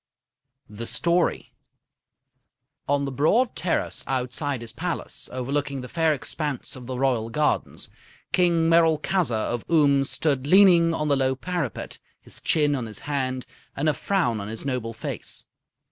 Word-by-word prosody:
THE 110 +2 -7
STORY 170 0 +1 1.4
On 140 0 +2
the 135 - -3
broad 215 - +2
terrace 175 - -1
outside 130 +1 -2
his 115 -1 -6
palace, 175 +5 -4
overlooking 135 +2 -2
the 125 - -7
fair 160 +3 +1
expanse 145 -1 -3
of 125 -2 -10
the 130 -1 -4
Royal 125 -4 +1
gardens, 150 +5 -1 0.4
King 170 -2 +3
Merolchazzar 165 0 +3 0.2
of 120 - -3
Oom 145 -4 +4
stood 140 -1 0
leaning 175 -2 +6
on 150 - -1
the 145 - +3
low 130 -1 +1
parapet, 170 - -4 0.2
his - - -5
chin 150 -2 +2
in 125 -5 -2
his 105 -2 -6
hand 130 -3 -2 0.3
and 145 +3 -1
a 155 - +4
frown 125 - 0
on 100 - -6
his 110 +4 -6
noble 125 -4 -2
face. 110 - -4
140 Hz, 145 wpm, -25 LUFS, 125-165 Hz, 1.4 s, leaning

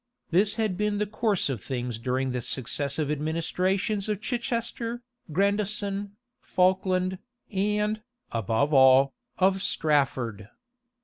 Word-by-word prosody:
[] - - -52
This 200 +5 +3
had 215 -5 0
been 210 0 0
the 210 - +1
course 210 -1 0
of 130 -7 -3
things 125 -3 -3
during 130 +2 -1
the 125 0 -2
successive 140 +4 -1
administrations 180 +7 0
of 210 -2 -1
Chichester, 235 0 -3 0.3
Grandison, 200 +2 0 0.3
Falkland, 185 0 +1 0.3
and, 210 +2 0 0.3
above 115 +7 0
all, 130 0 +6 0.2
of 190 0 +3
Strafford. 130 - 0
185 Hz, 115 wpm, -27 LUFS, 135-210 Hz, 0.3 s, all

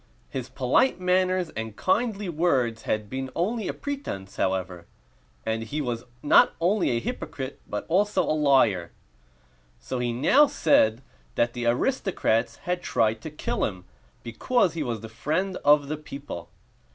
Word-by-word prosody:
His 130 -2 -4
polite 135 - +2
manners 185 -1 +1
and 110 -1 -5
kindly 210 - 0
words 135 -9 +1
had 110 -1 0
been 130 +3 -4
only 210 +5 -1
a - - 0
pretense, 270 - -6
however; 95 -2 -2 0.6
and 110 0 -1
he 130 +7 -4
was 120 -5 -3 0.2
not 145 - +5
only 185 +4 +2
a 120 - +1
hypocrite, 130 +3 -5
but 105 - -4
also 195 +3 +2
a - - 0
liar. 130 - +3 0.9
So 130 - -4
he 120 -1 0
now 265 - +5
said 120 - +3 0.3
that 120 0 +1
the 120 -1 -2
aristocrats 125 - +1
had 180 0 -1
tried 110 -6 +1
to - - -6
kill 150 - -3
him 95 -3 -3 0.4
because 175 - +1
he 165 - -3
was 120 -6 -3
the 110 - -7
friend 155 - -2
of 145 0 +4
the 155 +2 -3
people. 140 - -8
135 Hz, 150 wpm, -26 LUFS, 115-180 Hz, 0.9 s, not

